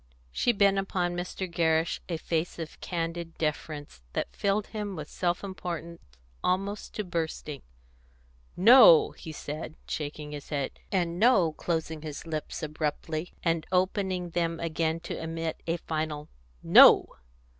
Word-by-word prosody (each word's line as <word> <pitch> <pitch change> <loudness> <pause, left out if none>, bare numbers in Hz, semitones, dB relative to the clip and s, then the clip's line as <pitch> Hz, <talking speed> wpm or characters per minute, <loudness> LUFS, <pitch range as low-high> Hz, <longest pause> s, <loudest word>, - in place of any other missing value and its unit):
She 240 - +2
bent 200 -3 +3
upon 180 -2 -1
Mr. 180 +1 -4
Gerrish 165 -1 +1
a 170 - -1
face 165 +1 -2
of 165 -2 -7
candid 165 -1 -4
deference 150 - -4
that - - -3
filled 200 +1 +1
him 210 -3 -5
with 150 -2 -6
self 175 +2 -1
importance 170 -3 -6 0.4
almost 195 +3 -1
to 210 - -2
bursting. 160 -5 -4 1.0
"No!" 215 -4 +8
he 160 - -9
said, 155 +1 -6
shaking 150 0 -5
his 145 -1 -8
head, 140 -3 -3
and 175 -2 0
"No!" 200 -8 +5
closing 160 -1 -3
his 150 -2 -7
lips 155 -2 -4
abruptly, 155 +2 -3
and 165 -2 0
opening 185 -1 0
them 165 -1 -1
again 165 0 -1
to - - -5
emit 165 0 -4
a 165 +1 +1
final 155 -2 -4 0.3
"No!" - - +7
165 Hz, 135 wpm, -28 LUFS, 155-180 Hz, 1.0 s, No